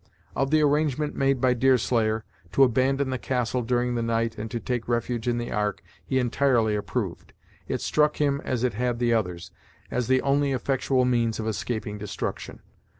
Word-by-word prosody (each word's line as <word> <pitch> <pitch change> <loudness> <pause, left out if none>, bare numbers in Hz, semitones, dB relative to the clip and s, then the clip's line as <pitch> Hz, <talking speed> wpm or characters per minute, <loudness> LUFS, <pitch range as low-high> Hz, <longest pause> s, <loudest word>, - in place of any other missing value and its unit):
Of 135 +1 0
the 155 +1 +4
arrangement 150 0 +1
made 135 -1 +2
by 125 0 +3
Deerslayer, 115 -3 +2 0.3
to 135 - +6
abandon 130 +2 +2
the 130 - -2
castle 125 -1 -1
during 125 +1 0
the 120 - -1
night 115 0 0
and 110 +1 -5
to 120 +1 -3
take 120 -1 -3
refuge 120 0 -1
in 120 -1 +1
the 120 0 -4
ark, 105 -2 -1 0.2
he 130 - -1
entirely 120 -3 +2
approved. 105 -1 -3 0.3
It - - -2
struck 150 0 +2
him 140 -1 +1
as 125 -2 -2
it 125 -4 +1
had 120 +2 -1
the 120 0 +2
others, 90 -6 -2 0.4
as 125 -2 -1
the 130 0 +3
only 140 0 +2
effectual 130 0 +1
means 115 -3 +1
of 110 - -3
escaping 110 -1 -3
destruction. 105 -1 -5
125 Hz, 180 wpm, -26 LUFS, 115-135 Hz, 0.4 s, to